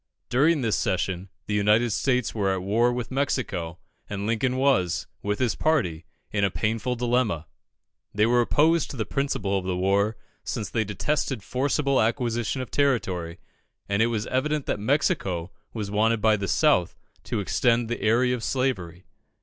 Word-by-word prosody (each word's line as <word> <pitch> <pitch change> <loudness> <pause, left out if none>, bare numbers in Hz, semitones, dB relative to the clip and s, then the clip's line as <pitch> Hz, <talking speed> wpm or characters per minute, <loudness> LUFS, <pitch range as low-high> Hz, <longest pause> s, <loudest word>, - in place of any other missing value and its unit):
During 145 +5 +3
this 115 -4 +1
session, 95 0 -1 0.2
the 105 - -3
United 105 +3 +3
States 125 +2 0
were 100 -3 0
at 95 -1 -2
war 115 +5 +2
with 120 -1 -4
Mexico, 125 - -2 0.3
and 100 -1 -4
Lincoln 120 +4 0
was, 130 - +2 0.2
with 105 0 -1
his 125 -4 +1
party, 125 - 0 0.3
in 100 -1 0
a 100 - +3
painful 115 +5 -1
dilemma. 120 -9 0 0.7
They 105 +1 +2
were 120 +1 +4
opposed 160 +6 +2
to 135 - -7
the 110 - -1
principle 135 -9 -1
of - - -8
the 90 -1 -1
war, 100 +4 +1 0.3
since 105 - -4
they 110 - +1
detested 110 +3 -2
forcible 140 +2 +1
acquisition 120 +2 0
of - - -11
territory, 95 -12 0 0.5
and 100 +1 +1
it 115 - +4
was 110 -2 -2
evident 145 +3 -1
that - - -2
Mexico 100 - 0 0.2
was 105 -3 -5
wanted 110 +2 +2
by 110 0 +4
the 100 -1 -3
South 140 - +2 0.3
to - - -2
extend 115 +3 +1
the 120 - -4
area 120 +3 +3
of 120 -2 -3
slavery. 95 -10 -2
115 Hz, 165 wpm, -25 LUFS, 100-130 Hz, 0.7 s, were